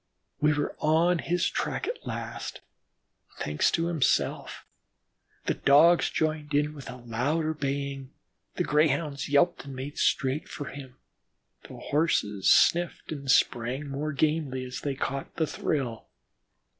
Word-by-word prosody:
We 150 +1 +3
were 145 0 -2
on 165 +3 +3
his 175 +1 0
track - - -2
at - - -5
last, - - -5 0.8
thanks 75 0 +1
to 165 - 0
himself. 165 -5 0 0.8
The - - +1
Dogs 160 +5 +5
joined 155 -2 -1
in 150 +1 +1
with 140 -3 -9
a - - -7
louder 130 +7 -1
baying, 140 -2 -3 0.5
the - - 0
Greyhounds 150 -1 +1
yelped 145 -1 +2
and 135 -1 -8
made 135 +3 -6
straight 145 +8 +1
for 145 - -6
him, 130 -3 -10 0.7
and - - -9
the - - -12
Horses 140 - +1
sniffed 175 -1 +3
and 140 -3 -6
sprang 130 +3 +2
more 145 +3 -3
gamely 145 -3 0
as 125 0 -6
they 140 -2 -2
caught 135 +1 -4
the 160 - +1
thrill. 130 -7 -3
145 Hz, 140 wpm, -27 LUFS, 135-155 Hz, 0.8 s, Dogs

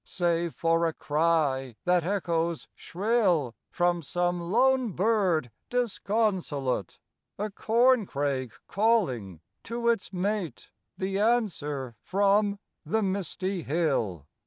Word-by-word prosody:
Save 170 -2 -1
for 165 0 +2
a 165 - -2
cry 145 -6 0
that 180 -1 +3
echoes 170 -3 -1
shrill 180 - +1 0.2
From 175 -1 +1
some 175 +3 -1
lone 250 +5 +2
bird 185 - +1 0.2
disconsolate; 195 - -1 0.4
A 210 +1 -3
corncrake 195 - +1
calling 150 - +1 0.2
to 235 0 -1
its 230 -5 0
mate; 185 - -3 0.3
The 190 +1 -2
answer 150 - 0
from 200 +1 +2 0.3
the 215 +8 0
misty 190 -1 -2
hill. 135 - -1
175 Hz, 100 wpm, -28 LUFS, 150-210 Hz, 0.4 s, that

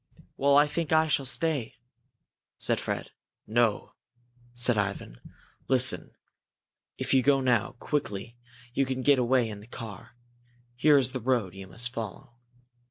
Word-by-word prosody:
"Well, 140 +1 +3
I 145 - +6
think 155 +1 -3
I 160 0 +4
shall 140 -3 +1
stay," 135 -1 -1 0.8
said - - +1
Fred. - - -4 0.3
"No," 110 -1 0 0.6
said 120 0 +3
Ivan. 100 - -3 0.5
"Listen! - - +2 0.8
If - - -2
you 130 - +5
go 135 +1 +3
now, 125 -4 +1
quickly, 115 -4 -4 0.4
you 135 - +2
can 130 0 -3
get 140 -1 +4
away 125 -1 +2
in 105 -2 -7
the 105 - -14
car. 115 -3 -9 0.6
Here 145 +4 +5
is 130 -2 +1
the 130 -1 -5
road 115 -6 0
you 95 0 -10
must 120 +7 -2
follow." 115 +3 -7
125 Hz, 145 wpm, -28 LUFS, 110-135 Hz, 0.8 s, I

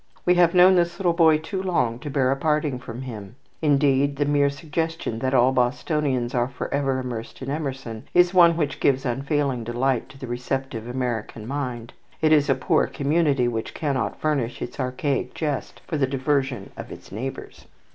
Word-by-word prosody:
We 180 - +5
have 175 -1 +4
known 180 +1 +8
this 170 0 +1
little 180 -3 +2
boy 160 -2 +5
too 185 +5 -4
long 125 -11 0
to 145 - -6
bear 135 -2 +2
a - - +2
parting 150 -2 0
from 125 +1 -7
him. 110 -4 -8 0.3
Indeed, 140 -2 +3
the 145 +1 0
mere 145 -1 +3
suggestion 160 -4 -3
that 130 +2 0
all 125 +1 +5
Bostonians 130 0 0
are 120 -1 +1
forever 135 +1 -2
immersed 125 -1 -6
in 135 - -4
Emerson 135 -7 -4
is 180 +1 +4
one 170 -2 +6
which 145 -4 -1
gives 135 0 +2
unfailing 135 0 -1
delight 120 +2 -1
to 135 - -14
the 135 - -7
receptive 125 -1 -3
American 120 -3 -3
mind. 125 -4 -4 0.3
It 155 -1 +3
is 145 -1 +4
a 135 - +4
poor 130 - +2
community 145 -3 +1
which 115 -2 -3
cannot 140 -6 -2
furnish 140 -6 -1
its 125 - -7
archaic 130 +2 -2
jest 150 -4 -3
for 155 - -2
the 135 -2 +2
diversion 135 -4 -1
of - - -8
its - - -11
neighbours. 130 +7 -7
135 Hz, 180 wpm, -24 LUFS, 125-150 Hz, 0.3 s, known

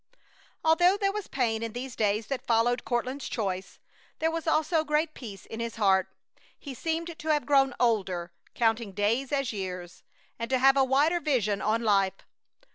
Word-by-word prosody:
Although 350 +4 +4
there 395 -1 +1
was 420 -1 -5
pain 225 -4 -1
in 230 -1 -4
these 250 0 -6
days 210 0 +1
that 275 +1 -5
followed 240 +1 +2
Courtland's 255 +3 -2
choice, 190 -4 -3 0.4
there 320 +1 0
was 330 0 -4
also 315 +1 +2
great 305 +1 0
peace 205 -6 -9
in 225 - -8
his 230 0 -4
heart. 190 -4 +3 0.5
He 280 - -8
seemed 325 +4 -3
to 315 - -8
have 300 -2 +2
grown 270 -3 +3
older, 185 -7 0 0.2
counting 225 -3 +1
days 225 +7 0
as 275 -5 0
years, 180 -3 -6 0.4
and 230 - -3
to 260 - +2
have 270 +2 +5
a 270 - +4
wider 285 +6 +3
vision 230 - 0
on 225 +2 0
life. 195 -3 +1
245 Hz, 175 wpm, -28 LUFS, 215-300 Hz, 0.5 s, have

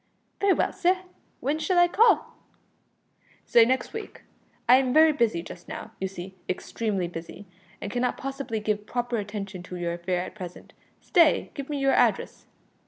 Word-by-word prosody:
"Very 400 -1 +4
well, - - 0
sir, 370 -1 +2 0.4
w'en 295 +3 0
shall 355 +4 0
I 350 0 +7
call?" 440 +7 +3 1.1
"Say 230 -1 +6
next 255 +1 0
week. 440 -1 -8 0.4
I 250 +2 +8
am 260 -1 +1
very 315 0 +7
busy 225 - +1
just 175 - -11
now, - - -7
you 190 - -1
see 190 0 -8 0.2
extremely 195 0 -2
busy, 170 +4 -9 0.3
and 205 - -5
cannot 245 +2 0
possibly 270 -4 -4
give 210 0 -2
proper 245 -1 -2
attention 200 -3 -5
to 180 0 -8
your 175 -1 -2
affair 175 +1 -1
at - - -8
present. 180 -4 -9 0.3
Stay 335 -6 +3
give 280 0 -6
me 295 - -2
your 275 -1 +2
address." - - +1
235 Hz, 170 wpm, -26 LUFS, 190-285 Hz, 1.1 s, I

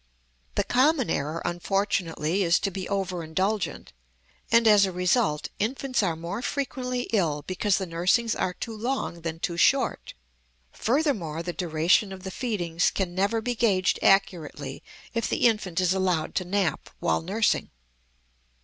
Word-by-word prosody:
The - - +2
common 265 +1 +2
error, 155 +4 -2
unfortunately, 175 -1 -1
is 175 -2 +4
to 195 - -1
be 190 0 -5
over 190 -3 -2
indulgent, 190 - -2 0.6
and, 230 0 +5
as 210 -2 +7
a - - -3
result, 180 -2 +1
infants 255 +3 0
are 175 -5 0
more 170 +7 -5
frequently 255 -2 -2
ill 155 -8 +1
because 190 +2 +1
the 190 - -2
nursings 185 +7 +1
are 180 - -1
too 225 -2 -6
long, 225 -6 -3
than 165 0 -4
too 170 0 -3
short. - - +2 0.6
Furthermore, 220 - 0
the 175 0 -4
duration 170 +4 +2
of 190 -1 -9
the 190 - -5
feedings 180 -8 0
can 185 -3 -2
never 200 +5 +1
be 245 +2 -1
gauged 200 -6 +2
accurately 165 -8 +1 0.3
if 230 -1 -1
the - - +1
infant 210 -7 +1
is 185 0 +3
allowed 180 -4 0
to 185 - -1
nap 190 -1 -1
while 80 - +1
nursing. 205 +5 0
190 Hz, 150 wpm, -26 LUFS, 170-220 Hz, 0.6 s, as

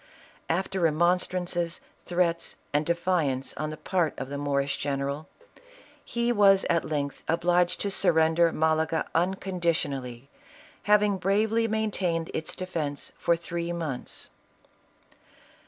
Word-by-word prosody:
After 190 +3 0
remonstrances, 175 +1 +1 0.3
threats, 175 -1 +1 0.2
and 150 +1 +1
defiance 170 -6 0
on 155 +1 -3
the 155 - -6
part 175 -5 0
of 130 - -5
the 140 - -3
Moorish 140 -1 0
general, 140 +3 -3 0.7
he 235 0 0
was 200 -3 +5
at 170 -1 +2
length 145 -2 -3
obliged 175 +1 +2
to 200 - -1
surrender 165 -2 +3
Malaga 160 +1 +1
unconditionally, 165 -8 -1 0.6
having 210 -1 +4
bravely 215 +4 +2
maintained 195 -7 -1
its 160 - -3
defence 160 -6 -3
for 170 - +3
three 170 0 -4
months. 160 -7 -5
170 Hz, 110 wpm, -27 LUFS, 155-185 Hz, 0.7 s, was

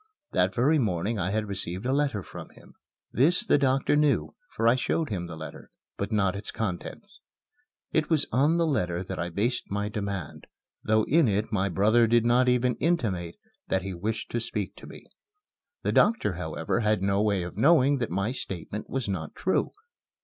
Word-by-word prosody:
That 90 +1 +1
very 145 +6 +3
morning 105 -1 -1
I 90 0 -1
had 110 +2 -1
received 95 0 -3
a 130 - +1
letter 140 -9 0
from - - -10
him. - - -18 0.4
This 155 - +3
the - - +3
doctor 135 +1 +2
knew, 150 -1 +2 0.2
for 115 - 0
I 115 - +6
showed 140 +4 -1
him 90 -4 -3
the 85 - -7
letter 80 -2 -9 0.3
but 100 +2 -4
not 100 -3 +1
its 100 - -6
contents. 110 - -5 0.7
It 155 -1 +1
was 160 -3 +2
on 145 +7 +3
the 170 - +2
letter 90 - -1
that - - -6
I 85 - -2
based 115 +8 -1
my 100 +1 -2
demand, 100 -7 -5 0.4
though 110 0 +3
in 155 +2 +3
it 105 +2 0
my 100 -2 +1
brother 110 +6 +3
did 115 0 +3
not 125 +1 +4
even 125 -1 +2
intimate 110 - -1 0.3
that 95 -1 0
he 95 -1 -4
wished 105 +5 -4
to 120 - 0
speak 105 -4 -4
to - - -11
me. - - -12 0.8
The - - +1
doctor, 210 - +3
however, 80 +3 -2
had 105 -3 +1
no 100 +1 +2
way 100 -4 +1
of 90 - -7
knowing 145 -3 +4
that 120 - -2
my 100 +6 -1
statement 105 -4 -6
was 130 -4 -2
not 85 -6 -4
true. 190 - 0
110 Hz, 190 wpm, -27 LUFS, 95-130 Hz, 0.8 s, I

